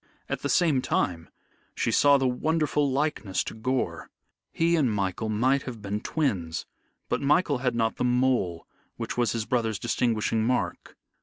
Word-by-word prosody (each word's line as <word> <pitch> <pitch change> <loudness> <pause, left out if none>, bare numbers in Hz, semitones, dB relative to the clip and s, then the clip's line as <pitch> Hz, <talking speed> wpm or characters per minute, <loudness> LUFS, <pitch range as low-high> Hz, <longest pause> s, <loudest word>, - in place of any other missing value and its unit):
At - - -3
the - - -2
same 160 -7 +3
time, 85 -8 -1 0.5
she - - 0
saw 145 -1 +5
the 135 -1 +1
wonderful 150 +2 +1
likeness 130 -9 -1
to - - -6
Gore. 130 +4 -2 0.4
He 170 +1 +2
and 140 -8 +2
Michael 100 +1 -2
might 130 +6 +2
have 125 -4 -7
been 105 0 -3
twins, 95 - -1 0.4
but - - -1
Michael 145 0 +2
had 125 -2 0
not 115 -1 0
the - - -1
mole 125 -9 +1 0.3
which - - -4
was 120 -2 +1
his 115 -2 -2
brother's 115 -4 0
distinguishing 115 -1 0
mark. 125 +2 -2
125 Hz, 160 wpm, -27 LUFS, 110-140 Hz, 0.5 s, saw